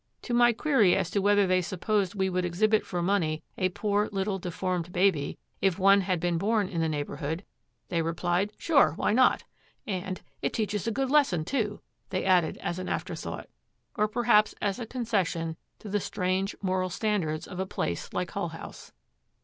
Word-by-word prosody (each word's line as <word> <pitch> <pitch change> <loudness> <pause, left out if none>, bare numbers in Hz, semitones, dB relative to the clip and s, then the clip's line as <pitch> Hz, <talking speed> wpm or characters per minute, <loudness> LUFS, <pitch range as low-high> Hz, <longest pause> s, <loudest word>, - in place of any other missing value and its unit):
To 245 - -3
my 240 0 +6
query 230 - +3
as 185 -2 -1
to 200 - +1
whether 205 0 +4
they 185 0 +3
supposed 190 +2 -1
we 190 -1 +1
would 185 -1 0
exhibit 210 +5 +2
for 175 -2 -2
money 170 -5 0
a 185 - +1
poor 205 +2 0
little 195 0 -1
deformed 180 -1 -3
baby, 180 -6 +1 0.2
if 190 -3 +2
one 195 +1 +5
had 185 -2 0
been 170 0 0
born 210 +1 +1
in 170 -3 -2
the 160 - +1
neighborhood, 150 +3 -3 0.4
they 170 -2 +1
replied, 175 +4 0
'Sure, 280 - +4
why - - +1
not?' 255 +2 +4 0.4
and, 185 -2 -4 0.2
'It - - -1
teaches 210 -1 -1
a - - +1
good 265 +4 -1
lesson, 235 - +3
too,' 215 -4 -2 0.3
they 185 - -2
added 180 -4 +3
as 175 - -2
an 185 - -4
afterthought, - - -4 0.5
or 210 - +2
perhaps 215 -1 +3
as 200 +2 -1
a 235 - -5
concession 190 -10 -1 0.2
to - - -11
the 205 +1 0
strange 190 0 -1
moral 185 -1 0
standards 180 -6 -1
of 180 - -7
a 190 - -1
place 85 - -3
like - - -2
Hull - - -2
House. - - -10
190 Hz, 180 wpm, -28 LUFS, 175-210 Hz, 0.5 s, my